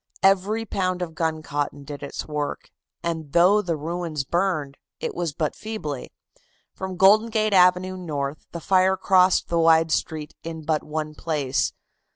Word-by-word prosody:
Every 195 +4 +3
pound 185 -3 -1
of 165 -2 -6
guncotton 155 -3 -2
did 145 0 -8
its 140 - -6
work, 150 -1 -4 0.3
and 160 -4 -4
though 185 +5 +5
the 170 -5 -2
ruins 165 -1 -3
burned, 155 -3 -1 0.2
it - - -3
was 175 -3 -2
but 150 +1 -2
feebly. 210 - -5 0.6
From 190 -1 -6
Golden 210 +5 +6
Gate 215 -2 +1
Avenue 180 0 +4
north 150 -5 -4
the 170 - -6
fire 190 +2 +3
crossed 185 -1 +3
the 170 - +1
wide 165 0 +4
street 155 -2 -2
in 160 -1 -6
but 155 -1 +1
one 155 0 -4
place. 150 -5 -1
165 Hz, 155 wpm, -24 LUFS, 150-185 Hz, 0.6 s, Golden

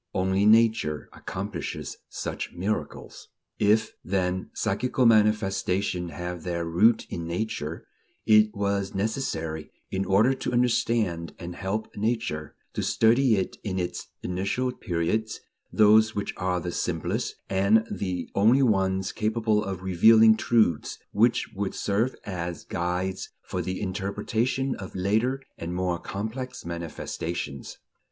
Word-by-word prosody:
Only 95 +2 +2
Nature 110 -9 +3
accomplishes - - -5
such - - -5
miracles. 100 +5 -4 0.3
If, 110 +2 +3
then, 95 -1 -1
psychical 125 0 0
manifestations 100 -4 +2
have 90 -1 -5
their 85 0 -2
root 105 +8 +3
in 85 -1 -4
Nature, 85 -3 -3 0.4
it 105 0 +6
was 100 -1 -1
necessary, 80 - -2 0.2
in 95 0 0
order 105 +7 +4
to - - -3
understand 115 -8 +1
and 85 -1 -7
help 105 +5 -3
Nature, 105 -9 -2 0.2
to - - -2
study 115 +1 +4
it 95 -2 -2
in 95 -3 -3
its 90 -1 -3 0.2
initial 100 +8 -1
periods, 110 +2 -2 0.3
those 110 +1 +5
which 100 - -2
are 90 -1 -1
the 90 0 -4
simplest, 85 -1 -2
and 100 +4 +3
the 90 -3 -3
only 115 +7 +5
ones 95 -4 +1
capable 110 -1 +1
of 95 -2 -5
revealing 110 +4 +6
truths 110 -9 +1
which 115 +4 +2
would 100 -1 -3
serve 110 +6 0
as 90 -4 -4
guides 90 +2 -2
for - - -3
the 95 0 -3
interpretation 105 +7 -1
of 95 - -8
later 110 +8 +1 0.2
and 85 +1 -4
more 90 -1 -1
complex 110 +7 -5
manifestations. 85 -3 -5
100 Hz, 125 wpm, -26 LUFS, 90-110 Hz, 0.4 s, it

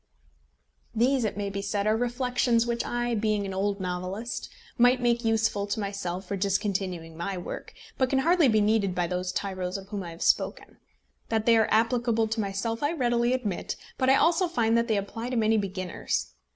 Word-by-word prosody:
These, 250 +2 +2
it 210 - -2
may 200 -1 -2
be 200 0 -3
said, 200 0 -1
are 215 +1 +3
reflections 245 0 +1
which 235 0 -1
I, 240 0 -1
being 215 -2 0
an 195 - -4
old 200 +1 -1
novelist, 185 +5 -4 0.3
might 245 +1 +5
make 240 -1 +1
useful 225 -2 +1
to 205 +2 -2
myself 195 -2 -4
for 200 - -3
discontinuing 190 -4 -1
my 185 +3 -3
work, 175 - -7 0.2
but 260 -1 +3
can 270 - +1
hardly 330 +2 +4
be 220 -3 +3
needed 205 -3 +2
by 175 0 +1
those 180 +1 -2
tyros 185 -1 -3
of 195 0 -11
whom 205 -2 -4
I 175 - -6
have 165 0 -6
spoken. - - 0 0.5
That 220 -1 0
they 235 - +6
are 220 -1 +3
applicable 230 0 +2
to 225 0 -1
myself 200 +3 -2
I 290 +3 +1
readily 240 -5 +1
admit, 215 -8 -2 0.2
but 260 - +3
I 265 - +7
also 340 +5 +3
find 230 -9 +1
that 235 0 +2
they 220 -3 +2
apply 225 +4 -4
to 255 - -2
many 220 0 +3
beginners. 185 - -3
215 Hz, 195 wpm, -27 LUFS, 195-240 Hz, 0.5 s, I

